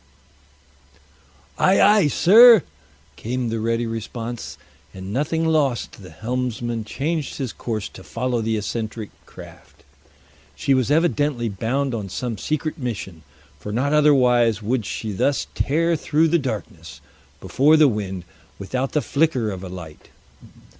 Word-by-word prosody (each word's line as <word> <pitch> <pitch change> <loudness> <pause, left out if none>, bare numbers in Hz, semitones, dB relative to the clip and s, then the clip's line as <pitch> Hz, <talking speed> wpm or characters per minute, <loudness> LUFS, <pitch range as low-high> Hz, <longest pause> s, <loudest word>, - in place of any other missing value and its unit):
"Ay, 190 +1 +4
ay, 205 -4 +5
sir!" 220 - +7 0.5
came 125 +1 -3
the 115 0 -2
ready 115 +1 -1
response, 115 +1 -6 0.4
and 95 +1 -7
nothing 155 +5 0
loth 150 -7 +1
the 95 -3 -13
helmsman 120 +3 -3
changed 150 +7 -3
his 130 -5 -4
course 110 -4 -4
to 95 - -13
follow 120 +2 -2
the 110 0 -1
eccentric 110 0 -4 0.2
craft. - - -14 0.7
She 140 - +1
was 130 -2 +1
evidently 145 -6 +1
bound 125 +7 -2
on 105 -4 -4
some 115 0 -4
secret 155 +4 -3
mission, 100 - -5 0.4
for 105 - -7
not 135 +7 0
otherwise 125 -7 +4
would 115 -1 -1
she 110 - -4
thus 135 +8 0
tear 165 +4 +1
through 160 +1 +1
the 170 +2 +3
darkness 90 - -6 0.4
before 150 - +3
the 155 -1 +6
wind 95 -6 -3 0.3
without 130 +7 -3
the 150 - +1
flicker 135 -6 0
of 95 -1 -7
a 95 - -7
light. 85 -4 -10
120 Hz, 135 wpm, -22 LUFS, 110-145 Hz, 0.7 s, sir